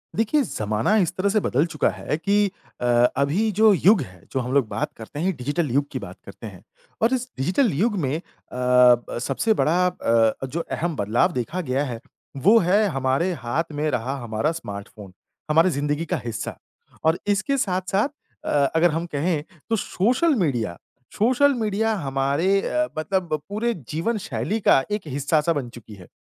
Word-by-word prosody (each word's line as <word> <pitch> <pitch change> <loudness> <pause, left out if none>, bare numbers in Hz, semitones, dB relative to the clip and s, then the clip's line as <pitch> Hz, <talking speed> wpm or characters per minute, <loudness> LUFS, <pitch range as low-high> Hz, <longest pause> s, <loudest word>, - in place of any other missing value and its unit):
देखिए 230 +8 +2
ज़माना 110 - 0
इस 175 -3 +1
तरह 195 +2 +1
से 215 +2 +2
बदल 145 -5 +1
चुका 155 -3 0
है 150 - -3
की 205 +4 +2 0.3
अ, - - -1 0.3
अभी 170 +11 +1
जो 215 +1 +5
युग 190 +2 +4
है, 90 -8 -10
जो 135 - -1
हम 125 0 -3
लोग 140 -5 +3
बात 105 +1 -3
करते 115 +6 -8
हैं 185 +3 0
डिजिटल 145 +5 -1
युग 140 +3 +1
की - - -3
बात - - -9
करते - - -9
है। - - -11 0.4
और 230 +4 +3
इस 250 -1 -1
डिजिटल 185 - +2
युग 205 +8 +1
में 135 +3 -1
अ, - - -8 0.3
ब 125 -1 +4
सबसे 140 - +1
बड़ा 170 -4 +1
अ, 115 -8 +1
जो 140 +6 -4
अहम 170 0 -2
बदलाव 115 - +1
देखा 155 +6 -3
गया 135 -3 -1
है, 120 -4 -5 0.4
वो 200 - +5
है 200 +4 +3
हमारे 135 +2 0
हाथ 155 +8 -2
में 150 +1 -1
रहा 125 +2 -2
हमारा 115 +6 -1
स्मार्ट 100 -11 -7
फ़ोन, 100 -4 -11 0.4
हमारी 165 +4 +5
जिंदगी 145 +3 -1
का - - -1
हिस्सा। 115 -2 -4 0.5
और 160 +2 +2
इसके 210 +8 +1
साथ-साथ 190 +2 0 0.4
अ, - - -3 0.3
अगर 170 +1 +4
हम 165 +2 -2
कहें, 155 +1 0 0.3
तो 225 - +2
सोशल 250 - +1
मीडिया 115 - -2 0.4
सोशल 260 +6 +4
मीडिया 220 +1 0
हमारे 140 +9 +1
अ, 310 +7 0
मतलब 170 -1 -1
पूरे 225 +4 -1 0.2
जीवन-शैली 210 +4 -2
का 135 - +5
एक 210 0 -1
हिस्सा-सा 150 +4 +1
बन 135 -6 -3
चुकी 110 -2 -12
है। 90 -3 -14
160 Hz, 180 wpm, -23 LUFS, 130-200 Hz, 0.5 s, जो